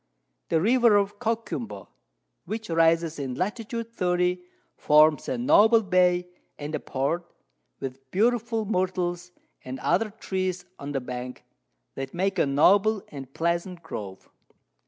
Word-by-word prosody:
The 165 Hz, -, +3 dB
River 235 Hz, +3 st, +4 dB
of 205 Hz, 0 st, +1 dB
Coquimbo, 230 Hz, 0 st, -3 dB, 0.6 s
which 220 Hz, -4 st, -5 dB
rises 165 Hz, -1 st, +2 dB
in 130 Hz, -3 st, -4 dB
Lat. 195 Hz, -, -1 dB
30, 180 Hz, -6 st, -1 dB, 0.3 s
forms 150 Hz, +1 st, +4 dB
a -, -, -1 dB
noble 230 Hz, -2 st, +5 dB
Bay 180 Hz, -2 st, +2 dB, 0.3 s
and 150 Hz, +1 st, -6 dB
a -, -, -1 dB
Port, 155 Hz, +6 st, -2 dB, 0.5 s
with 135 Hz, 0 st, -7 dB
beautiful 225 Hz, -, +1 dB
Myrtles, 180 Hz, -3 st, -1 dB, 0.3 s
and 130 Hz, +1 st, -6 dB
other 215 Hz, -, +1 dB
Trees 185 Hz, -4 st, -3 dB
on 145 Hz, +1 st, -6 dB
the 135 Hz, -, -1 dB
Bank, 125 Hz, 0 st, -7 dB, 0.5 s
that 135 Hz, +2 st, -6 dB
make 190 Hz, +2 st, 0 dB
a -, -, +3 dB
noble 195 Hz, +9 st, +4 dB
and 140 Hz, -2 st, -8 dB
a -, -, -26 dB
pleasant 170 Hz, +5 st, -2 dB
Grove. 100 Hz, -11 st, -7 dB
180 Hz, 135 wpm, -26 LUFS, 150-210 Hz, 0.6 s, noble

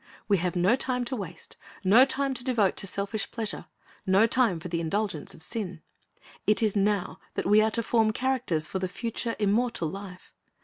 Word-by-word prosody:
We 200 Hz, -2 st, +4 dB
have 180 Hz, 0 st, -2 dB
no 180 Hz, +6 st, +4 dB
time 255 Hz, -2 st, -1 dB
to 255 Hz, -, -2 dB
waste, 180 Hz, -7 st, -8 dB, 0.3 s
no 220 Hz, +7 st, +7 dB
time 275 Hz, 0 st, 0 dB
to 245 Hz, -1 st, -4 dB
devote 235 Hz, -7 st, +2 dB
to 195 Hz, -, -2 dB
selfish 200 Hz, +3 st, -3 dB
pleasure, 225 Hz, -2 st, -4 dB, 0.4 s
no 195 Hz, +3 st, +4 dB
time 230 Hz, -7 st, +2 dB
for 170 Hz, -, -7 dB
the 170 Hz, -1 st, -2 dB
indulgence 180 Hz, -1 st, -2 dB
of 160 Hz, -, -5 dB
sin. 185 Hz, -5 st, -4 dB, 0.6 s
It 215 Hz, +2 st, +3 dB
is 215 Hz, -2 st, +1 dB
now 200 Hz, -2 st, 0 dB, 0.2 s
that -, -, -2 dB
we 210 Hz, +2 st, +5 dB
are 220 Hz, -, +3 dB
to 230 Hz, +1 st, 0 dB
form 225 Hz, -1 st, +2 dB
characters 250 Hz, -10 st, 0 dB
for 190 Hz, -, -4 dB
the 185 Hz, -, -1 dB
future, 230 Hz, +3 st, -3 dB
immortal 215 Hz, -1 st, +1 dB
life. 195 Hz, 0 st, -10 dB
210 Hz, 190 wpm, -27 LUFS, 185-235 Hz, 0.6 s, no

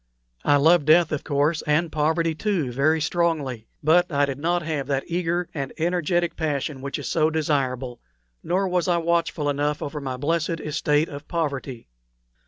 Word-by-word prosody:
I 145 Hz, -, +4 dB
loved 160 Hz, +2 st, +4 dB
death, 165 Hz, +1 st, +5 dB
of 150 Hz, -, -2 dB
course, 150 Hz, +2 st, +1 dB
and 155 Hz, +2 st, +2 dB
poverty, 160 Hz, +2 st, +1 dB
too, 165 Hz, -6 st, -1 dB
very 150 Hz, +6 st, +2 dB
strongly; 155 Hz, -8 st, -1 dB, 0.2 s
but 175 Hz, +4 st, +4 dB
I 145 Hz, -1 st, +3 dB
did 135 Hz, -1 st, -5 dB
not 170 Hz, +3 st, 0 dB
have 150 Hz, -4 st, -3 dB
that 135 Hz, -1 st, 0 dB
eager 175 Hz, 0 st, -1 dB
and 140 Hz, -4 st, -4 dB
energetic 175 Hz, 0 st, 0 dB
passion 145 Hz, -3 st, -2 dB
which 140 Hz, +1 st, -4 dB
is -, -, -6 dB
so 155 Hz, -1 st, +2 dB
desirable, 135 Hz, -6 st, -1 dB, 0.4 s
nor 190 Hz, +3 st, 0 dB
was 180 Hz, -1 st, 0 dB
I 175 Hz, -1 st, +3 dB
watchful 170 Hz, -3 st, 0 dB
enough 145 Hz, +1 st, 0 dB
over 150 Hz, 0 st, -5 dB
my 130 Hz, -2 st, -4 dB
blessed 165 Hz, +3 st, -1 dB
estate 150 Hz, +1 st, +1 dB
of 145 Hz, +1 st, -9 dB
poverty. 140 Hz, -, -3 dB
155 Hz, 170 wpm, -24 LUFS, 140-170 Hz, 0.4 s, death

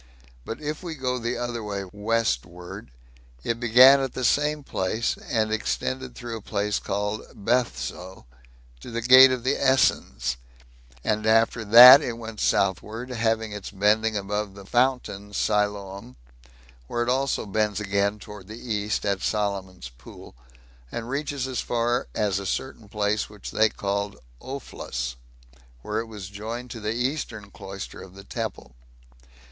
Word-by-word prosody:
But 115 Hz, -, -5 dB
if 150 Hz, 0 st, -4 dB
we 170 Hz, -3 st, -6 dB
go 130 Hz, -2 st, -2 dB
the 120 Hz, +1 st, -2 dB
other 120 Hz, -1 st, -3 dB
way 100 Hz, -2 st, -4 dB
westward, 90 Hz, -, -2 dB, 0.5 s
it 115 Hz, 0 st, -2 dB
began 125 Hz, +4 st, +7 dB
at 135 Hz, -2 st, -2 dB
the 130 Hz, -, -4 dB
same 150 Hz, +5 st, +2 dB
place, 110 Hz, -1 st, -1 dB
and 110 Hz, -2 st, +1 dB
extended 130 Hz, +3 st, -2 dB
through 120 Hz, -2 st, -6 dB
a -, -, -10 dB
place 105 Hz, 0 st, -1 dB
called 105 Hz, +2 st, -2 dB
"Bethso," 100 Hz, -, -2 dB, 0.5 s
to -, -, -10 dB
the 115 Hz, 0 st, -4 dB
gate 130 Hz, +2 st, +9 dB
of 125 Hz, -2 st, -2 dB
the 130 Hz, +2 st, +1 dB
Essens; 65 Hz, -, +1 dB, 0.7 s
and 110 Hz, 0 st, 0 dB
after 115 Hz, +1 st, +3 dB
that 125 Hz, +6 st, +11 dB
it 120 Hz, -5 st, -4 dB
went 115 Hz, -2 st, -8 dB
southward, 110 Hz, +6 st, 0 dB
having 110 Hz, -2 st, 0 dB
its 105 Hz, -2 st, -6 dB
bending 105 Hz, +2 st, +2 dB
above 100 Hz, 0 st, -3 dB
the 100 Hz, -1 st, -11 dB
fountain 120 Hz, -4 st, 0 dB
Siloam, 100 Hz, -8 st, -1 dB, 0.7 s
where 120 Hz, -, -1 dB
it 120 Hz, -, -2 dB
also 135 Hz, 0 st, 0 dB
bends 105 Hz, 0 st, 0 dB
again 100 Hz, 0 st, 0 dB
towards 105 Hz, -2 st, -11 dB
the 110 Hz, -, -8 dB, 0.2 s
east 105 Hz, 0 st, -1 dB
at 100 Hz, -1 st, 0 dB
Solomon's 95 Hz, -, -2 dB
pool, -, -, -14 dB, 0.6 s
and 115 Hz, 0 st, -5 dB
reaches 140 Hz, -1 st, -2 dB
as 130 Hz, -1 st, -2 dB
far 120 Hz, +1 st, 0 dB
as 100 Hz, -3 st, 0 dB
a 100 Hz, -, -5 dB
certain 115 Hz, -1 st, -4 dB
place 105 Hz, 0 st, -1 dB
which 105 Hz, -1 st, -9 dB
they 110 Hz, 0 st, +3 dB
called 100 Hz, 0 st, -3 dB, 0.2 s
"Ophlas," 70 Hz, -, -5 dB, 0.7 s
where 105 Hz, +1 st, -2 dB
it 115 Hz, -, -4 dB
was 105 Hz, -4 st, -8 dB
joined 115 Hz, +5 st, -6 dB
to 115 Hz, -, -6 dB
the 105 Hz, 0 st, -3 dB
eastern 120 Hz, -5 st, -3 dB
cloister 95 Hz, -1 st, -8 dB
of 95 Hz, 0 st, -12 dB
the 100 Hz, -, -11 dB
temple. 110 Hz, -, -6 dB
110 Hz, 150 wpm, -25 LUFS, 100-120 Hz, 0.7 s, that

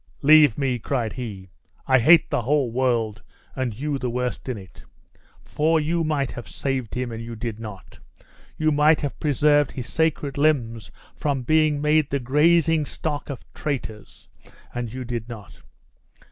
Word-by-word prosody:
"Leave 150 Hz, -5 st, +6 dB
me!" 130 Hz, -3 st, 0 dB
cried 115 Hz, -2 st, -2 dB
he; 100 Hz, -7 st, -7 dB, 0.3 s
"I 130 Hz, -1 st, +4 dB
hate 160 Hz, +6 st, +5 dB
the -, -, +1 dB
whole 135 Hz, 0 st, +1 dB
world, 115 Hz, -4 st, 0 dB, 0.3 s
and 125 Hz, -4 st, -3 dB
you 145 Hz, -1 st, -2 dB
the 125 Hz, -, -2 dB
worst 125 Hz, +1 st, -3 dB
in 125 Hz, -, -3 dB
it; 95 Hz, -2 st, -13 dB, 0.6 s
for 160 Hz, +2 st, +1 dB
you 165 Hz, +2 st, 0 dB
might 145 Hz, -4 st, -1 dB
have 120 Hz, -, -8 dB
saved 130 Hz, -5 st, -3 dB
him, 125 Hz, -1 st, -3 dB
and 115 Hz, 0 st, -6 dB
you 115 Hz, 0 st, -7 dB
did 110 Hz, -1 st, -5 dB
not 105 Hz, -5 st, -10 dB, 0.6 s
you 155 Hz, 0 st, +2 dB
might 150 Hz, +1 st, +4 dB
have 145 Hz, -2 st, -4 dB
preserved 145 Hz, -1 st, +2 dB
his 125 Hz, -2 st, -6 dB
sacred 150 Hz, -3 st, 0 dB
limbs 120 Hz, -7 st, +1 dB, 0.3 s
from 140 Hz, -3 st, -2 dB
being 155 Hz, +2 st, +2 dB
made 150 Hz, 0 st, +2 dB
the 140 Hz, -, -1 dB
gazing 155 Hz, +4 st, +3 dB
stock 150 Hz, -2 st, -4 dB
of 135 Hz, -4 st, -7 dB
traitors, 115 Hz, -8 st, -6 dB, 0.5 s
and 120 Hz, -2 st, -4 dB
you 130 Hz, +1 st, -6 dB
did 120 Hz, -1 st, -5 dB
not. 110 Hz, -5 st, -11 dB
130 Hz, 160 wpm, -23 LUFS, 120-150 Hz, 0.6 s, Leave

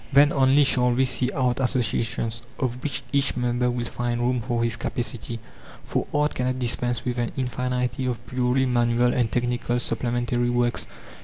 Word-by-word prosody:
Then 145 Hz, +1 st, +6 dB
only 135 Hz, +1 st, +5 dB
shall 125 Hz, -2 st, +3 dB
we 130 Hz, +2 st, +3 dB
see 130 Hz, 0 st, +1 dB
art 125 Hz, -2 st, 0 dB
associations, 115 Hz, -2 st, 0 dB, 0.2 s
of 125 Hz, -2 st, -2 dB
which 145 Hz, -3 st, -2 dB
each 140 Hz, -2 st, +1 dB
member 125 Hz, 0 st, +1 dB
will 120 Hz, -1 st, -2 dB
find 120 Hz, +1 st, -2 dB
room 125 Hz, 0 st, +1 dB
for 120 Hz, 0 st, -1 dB
his 115 Hz, -2 st, +1 dB
capacity; 120 Hz, -1 st, -3 dB, 0.5 s
for -, -, -1 dB
art 150 Hz, 0 st, +1 dB
cannot 125 Hz, 0 st, -1 dB
dispense 120 Hz, -1 st, -1 dB
with 125 Hz, -1 st, -1 dB
an 120 Hz, -, -1 dB
infinity 125 Hz, 0 st, -1 dB
of 120 Hz, -1 st, -3 dB
purely 125 Hz, +2 st, +1 dB
manual 120 Hz, -1 st, +2 dB
and 120 Hz, -4 st, +1 dB
technical 120 Hz, +1 st, 0 dB
supplementary 120 Hz, +1 st, -1 dB
works. 120 Hz, -1 st, 0 dB
125 Hz, 165 wpm, -25 LUFS, 120-130 Hz, 0.5 s, Then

